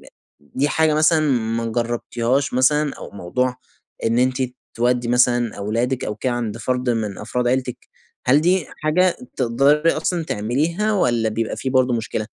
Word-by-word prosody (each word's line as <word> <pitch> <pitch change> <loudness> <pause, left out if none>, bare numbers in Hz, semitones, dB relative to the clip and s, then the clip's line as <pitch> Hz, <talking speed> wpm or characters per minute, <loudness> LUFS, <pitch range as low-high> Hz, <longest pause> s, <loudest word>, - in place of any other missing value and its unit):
د - - -17 0.5
دي 140 +3 +1
حاجة 160 -1 +2
مثلًا 155 +1 +4
ما 115 -2 0
جربتيهاش 120 +3 -1
مثلًا؟ 145 +3 +2
أو - - -9
موضوع 125 +7 -2 0.5
إن 115 +1 +2
أنتِ 130 +1 +1 0.3
تودّي 120 0 +1
مثلًا 120 -2 +2
أولادِك 115 +5 -1
أو 105 - -3
كده 125 +3 -1
عند 115 -3 -3
فرد 125 +1 -1
من 110 -4 -2
أفراد 120 +3 -2
عيلتك، 125 -1 -1 0.5
هل 135 +4 +5
دي 180 +1 +2 0.2
حاجة 180 +3 +3 0.2
تقدري 140 +6 +3
أصلًا 165 +1 -1
تعمليها 155 - -1
والّا 120 - +1
بيبقي 110 +1 -2
في 130 - -3
برضه 130 -2 +2
مشكلة؟ 110 -1 -3
125 Hz, 155 wpm, -21 LUFS, 115-145 Hz, 0.5 s, هل